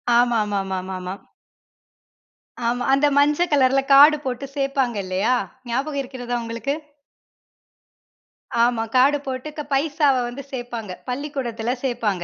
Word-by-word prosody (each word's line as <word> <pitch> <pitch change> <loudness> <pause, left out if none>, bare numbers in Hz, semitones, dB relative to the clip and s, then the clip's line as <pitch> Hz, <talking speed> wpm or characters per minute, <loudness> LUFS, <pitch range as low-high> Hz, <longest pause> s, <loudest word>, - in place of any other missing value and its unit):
ஆமாமாமாமாமா. 195 -6 0 1.5
ஆமா. 245 +1 0
அந்த 285 +2 +4
மஞ்ச 295 +4 +4
கலருல 270 -1 +4
கார்டு 295 +2 +8
போட்டு 255 +1 -3
சேர்ப்பாங்க 275 -4 0
இல்லயா, 190 +7 +1 0.4
ஞாபகம் 275 +4 -1
இருக்கிறதா 245 -2 -4
உங்களுக்கு? 230 +5 -3 1.9
ஆமா, 235 -2 +2
கார்டு 280 +3 +5
போட்டு 260 +3 -4
க - - -2
பைசாவ 285 -1 +2
வந்து 260 +3 -7
சேர்ப்பாங்க, 235 -7 -6
பள்ளிக்கூடத்துல 250 -3 -3
சேர்ப்பாங்க. 215 -8 -1
250 Hz, 105 wpm, -22 LUFS, 230-275 Hz, 1.9 s, கார்டு